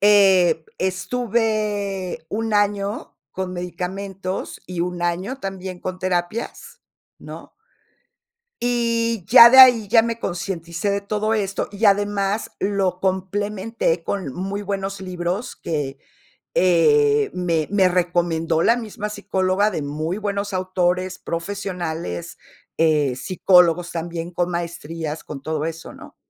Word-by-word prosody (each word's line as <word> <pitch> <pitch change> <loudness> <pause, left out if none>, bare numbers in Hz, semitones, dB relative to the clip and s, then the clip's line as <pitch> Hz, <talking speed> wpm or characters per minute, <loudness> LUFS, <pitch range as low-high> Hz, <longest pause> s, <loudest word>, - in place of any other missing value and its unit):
eh, 190 -5 +5
estuve 205 -2 -1
un 220 +1 -2
año 205 0 -1
con 185 +2 -4
medicamentos 185 +2 -5
y 180 -2 -4
un 175 0 -2
año 180 +9 -2
también 190 -4 -6
con 185 +1 -5
terapias, 185 +4 -3 0.4
¿no? - - -11 1.1
Y, 230 -3 0
ya 235 +1 +10
de 265 - +8
ahí, 240 -5 +8
ya 225 +2 +6
me 230 0 -3
concienticé 175 -1 -3
de 200 0 0
todo 215 +2 -1
esto. 195 -3 -1
Y, 210 +2 -1
además, 205 +1 +1
lo 195 -2 0
complementé 190 -1 -1
con 170 -8 -3
muy 195 +2 -4
buenos 195 0 -3
libros 185 +3 -4
que, 145 -4 -3 0.6
eh, 430 - +4
me 170 -4 0
me 195 -3 +4
recomendó 170 -2 0
la 230 - +4
misma 210 -3 -5
psicóloga 190 0 0
de 160 -6 -3
muy 155 +6 -3
buenos 205 -1 -3
autores, 185 0 -1
profesionales, 170 - -4 0.4
eh, 150 -5 +2
psicólogos, 180 +2 +3
también 170 +1 -5
con 175 +1 -1
maestrías, 165 -2 -5
con 145 -2 -7
todo 155 0 -2
eso, 165 0 -6
¿no? - - -13
185 Hz, 120 wpm, -22 LUFS, 175-205 Hz, 1.1 s, ya